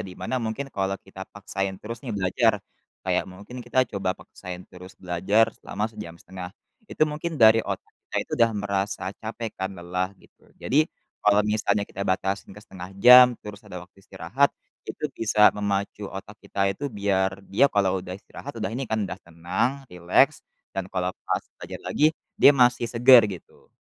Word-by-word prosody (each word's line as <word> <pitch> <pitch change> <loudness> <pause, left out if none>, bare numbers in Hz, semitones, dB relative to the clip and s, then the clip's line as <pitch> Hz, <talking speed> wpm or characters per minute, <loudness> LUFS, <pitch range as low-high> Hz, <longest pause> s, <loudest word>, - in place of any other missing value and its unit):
di 90 - -10
mana 130 - -3
mungkin, 115 +5 -3
kalau 95 0 -1
kita 95 -1 -10
paksain 95 -1 -4
terus 115 +2 -6
nih 120 - -4
belajar, 95 -2 +2 0.4
kayak - - +1
mungkin 100 +6 -11
kita 130 - +2
coba 95 -1 0
paksain 90 0 -9
terus 90 +1 -12
belajar 95 +5 +2
selama 105 +1 -4
sejam 105 -6 -9
1/2, 90 -1 -8 0.4
itu - - -1
mungkin 155 +2 -4
dari 110 0 +7
otak - - -5 0.2
kita - - -3
itu - - -41
udah 115 -1 +5
merasa 100 0 -2
capek 115 0 -5
kan 95 0 -2
lelah, 90 +2 -3
gitu. - - -24
Jadi, 155 +4 +2 0.3
kalau 105 0 +4
misalnya 105 -1 +1
kita 100 - -10
batasin 95 +1 -1
ke - - -10
1/2 90 0 -10
jam 125 +3 +9
terus 105 -1 -8
ada 90 - -9
waktu 90 +2 -24
istirahat, 95 +9 0 0.4
itu - - -6
bisa 105 -1 +4
memacu 100 0 -2
otak 100 +2 -9
kita 100 - -2
itu 140 +8 -5
biar 100 -3 -1
dia 120 +10 +3
kalau 95 -5 +1
udah 90 0 -7
istirahat 135 +6 -10
udah 110 0 -3
ini 125 +1 -4
kan 110 -1 0
udah 95 - -6
tenang, 90 +12 -2
rileks, 90 0 +3 0.3
dan 95 -1 -4
kalau 90 -1 -2 0.2
pas - - 0 0.2
belajar - - -8
lagi, 150 - +2 0.3
dia 145 - +9
masih 125 -2 +4
segar, 120 0 +7
gitu. 95 -4 -11
100 Hz, 175 wpm, -25 LUFS, 95-115 Hz, 0.4 s, jam